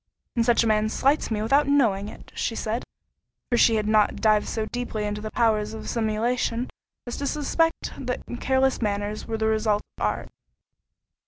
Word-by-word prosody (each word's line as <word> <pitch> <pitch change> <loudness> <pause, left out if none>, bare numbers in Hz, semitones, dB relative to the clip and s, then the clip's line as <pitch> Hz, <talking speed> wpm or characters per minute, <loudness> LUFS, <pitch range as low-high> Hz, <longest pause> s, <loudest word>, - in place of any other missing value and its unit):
"And 235 - +3
such 235 0 +4
a - - +1
man 215 0 +2
slights 275 +6 +1
me 215 -2 -1
without 275 +6 +3
knowing 220 -8 +2
it," - - -13
she 225 - -2
said—for 230 +2 -6
she 225 - +5
had 215 -1 0
not 215 -1 +3
dived 215 -1 +3
so 220 -1 -2
deeply 235 -2 -4
into 210 0 -3
the 215 - -4
powers 215 -2 +1
of 220 - -8
simulation, 230 +2 0 0.3
as 240 - -5
to 280 - -2
suspect 320 +3 0
that 250 - -2
such 240 - -6
careless 265 -1 +2
manners 205 0 -2
were 225 -1 -2
the 220 - 0
result 215 -1 +1 0.2
of - - -3
art. - - -1
225 Hz, 180 wpm, -25 LUFS, 215-245 Hz, 0.3 s, she